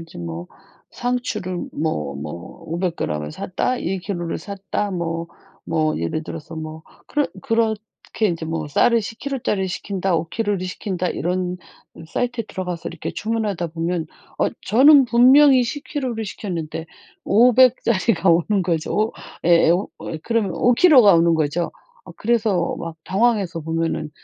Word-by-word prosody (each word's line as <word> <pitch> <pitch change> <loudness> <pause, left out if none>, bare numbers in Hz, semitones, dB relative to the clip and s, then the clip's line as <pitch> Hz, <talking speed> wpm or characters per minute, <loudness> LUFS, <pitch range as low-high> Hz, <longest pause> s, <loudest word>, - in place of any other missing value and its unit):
이제 165 0 -12
뭐 85 +1 -6 0.4
상추를 215 -7 -3
뭐 75 - -2
뭐 75 +5 -8
500g 165 - -2
을 75 - -7
샀다, 250 - -2
1kg 180 -1 -3
를 - - -3
샀다 200 +2 -4
뭐 170 -2 -3 0.4
뭐 155 -1 0
예를 85 - -2
들어서 165 0 -8
뭐 160 0 -7 0.2
그렇 295 -1 0
그렇게 225 -3 -1
이제 165 -1 -4
뭐 160 -2 -3
쌀을 230 +10 +3
10kg 255 +6 -5
짜리를 195 -5 -1
시킨다, 190 -1 -2
5kg 200 +6 -1
를 185 - -4
시킨다 185 -1 -3
이런 180 +1 -2 0.4
음 165 - -10
사이트에 240 +5 -2
들어가서 180 -3 -5
이렇게 165 - -5
주문하다 210 -6 -2
보면 165 +1 -2 0.3
어 - - +3
저는 270 +5 +6
분명히 255 +3 +6
10kg 285 0 -4
를 220 0 -3
시켰는데 165 -5 -5 0.4
500 250 +3 +5
짜리가 195 -4 +1
오는 185 +4 +2
거죠. 180 +6 0 0.3
예 170 -1 +5
오 180 +4 +1
어 - - -5
그러면 230 -2 0
5kg 250 - +6
가 200 -4 +7
오는 165 0 +4
거죠. 160 +2 -1 0.3
어 - - -11
그래서 210 -6 0
막 165 -1 -6
당황해서 195 -4 +1
보면은 160 -1 -2
185 Hz, 280 characters per minute, -21 LUFS, 165-225 Hz, 0.4 s, 가